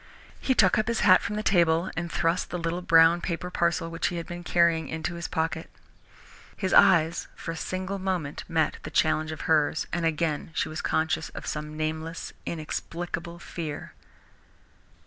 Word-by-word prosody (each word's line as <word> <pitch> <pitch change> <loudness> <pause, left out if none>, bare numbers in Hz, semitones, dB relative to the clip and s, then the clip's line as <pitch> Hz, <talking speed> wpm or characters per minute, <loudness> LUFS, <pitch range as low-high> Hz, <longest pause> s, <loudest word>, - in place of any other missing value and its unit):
He 260 - +1
took 190 -2 +5
up 215 - 0
his 235 -1 0
hat 185 -2 +7
from 210 - -3
the 215 - -2
table, 170 -3 +3
and 170 +1 -3
thrust 165 +2 0
the 180 - -3
little 170 +1 -2
brown 165 0 +5
paper 180 +1 -3
parcel 170 -1 +1
which 165 - -1
he 175 - -3
had 170 -1 -4
been 175 0 -7
carrying, 170 -3 +2
into 160 +3 -3
his 170 0 -4
pocket. 160 -1 -2 0.9
His 190 -2 -1
eyes 170 -4 +5
for 165 - -5
a - - -5
single 185 +4 -3
moment 180 -6 -2
met 160 -3 0
the - - -7
challenge 155 +1 +1
of 155 - -6
hers, 155 -1 +2
and 175 0 -1
again 160 -1 0
she - - 0
was 155 - -4
conscious 160 0 0
of - - -6
some 150 0 -4
nameless, 160 +1 -4
inexplicable 170 +1 -4
fear. 160 -3 -6
165 Hz, 175 wpm, -27 LUFS, 160-175 Hz, 0.9 s, hat